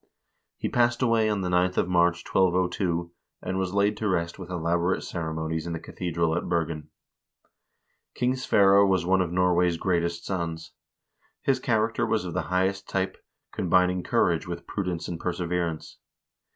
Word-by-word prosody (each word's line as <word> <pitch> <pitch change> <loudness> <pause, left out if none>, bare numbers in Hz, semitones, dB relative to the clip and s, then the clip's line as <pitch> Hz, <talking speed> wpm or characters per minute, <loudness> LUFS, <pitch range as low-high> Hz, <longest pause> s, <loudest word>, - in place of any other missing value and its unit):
He - - -2
passed 120 +1 +2
away 115 -2 +3
on 105 -2 0
the 90 - -2
9th 90 +1 +1
of - - +2
March, 85 -1 +2
1202, 90 -2 +1 0.3
and 95 +1 -2
was 95 0 -2
laid 100 +1 +2
to 110 - -2
rest 85 -2 -1
with 90 -2 -8
elaborate 85 +1 0
ceremonies 80 -1 -3
in 85 - -3
the 80 - -4
cathedral 85 -2 -2
at 85 - -3
Bergen. 80 -3 -2 1.3
King 125 +1 +1
Sverre 100 -6 +5
was 95 -3 +2
one 95 +1 +3
of 90 -2 -1
Norway's 90 -1 +2
greatest 85 -1 -1
sons. 85 -4 -4 0.7
His - - +2
character - - 0
was - - 0
of - - -5
the - - 0
highest 95 +2 0
type, 95 0 -1 0.4
combining 90 0 +2
courage 85 -2 +1
with 85 0 -6
prudence 90 -4 -3
and 85 -2 -5
perseverance. 85 -2 -3
90 Hz, 155 wpm, -26 LUFS, 85-95 Hz, 1.3 s, Sverre